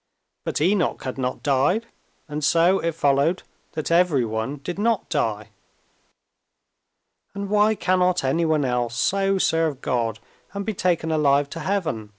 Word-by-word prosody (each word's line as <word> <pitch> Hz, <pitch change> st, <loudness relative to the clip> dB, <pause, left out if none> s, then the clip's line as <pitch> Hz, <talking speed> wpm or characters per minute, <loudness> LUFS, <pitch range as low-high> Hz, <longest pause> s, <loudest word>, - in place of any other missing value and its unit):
But -, -, -2 dB
Enoch 185 Hz, +2 st, +1 dB
had 130 Hz, 0 st, -5 dB
not 125 Hz, 0 st, -3 dB
died, 145 Hz, -, +2 dB, 0.4 s
and 150 Hz, 0 st, -5 dB
so 170 Hz, +6 st, +4 dB
it 165 Hz, -1 st, -2 dB
followed 145 Hz, +4 st, +1 dB, 0.3 s
that 155 Hz, +1 st, -4 dB
everyone 135 Hz, -7 st, +1 dB
did 175 Hz, +5 st, -5 dB
not 225 Hz, -1 st, +1 dB
die. 105 Hz, -1 st, -1 dB, 1.9 s
"And 200 Hz, 0 st, -5 dB
why 210 Hz, +1 st, +4 dB
cannot 180 Hz, -2 st, +1 dB
anyone 155 Hz, +1 st, +1 dB
else 120 Hz, -2 st, -1 dB
so 195 Hz, +6 st, +1 dB
serve 165 Hz, -6 st, +1 dB
God 115 Hz, -4 st, -1 dB, 0.4 s
and 200 Hz, 0 st, -4 dB
be 220 Hz, -, -2 dB
taken 170 Hz, -3 st, 0 dB
alive 145 Hz, -2 st, +2 dB
to 165 Hz, -, -6 dB
heaven?" 160 Hz, -, -2 dB
160 Hz, 140 wpm, -23 LUFS, 135-185 Hz, 1.9 s, so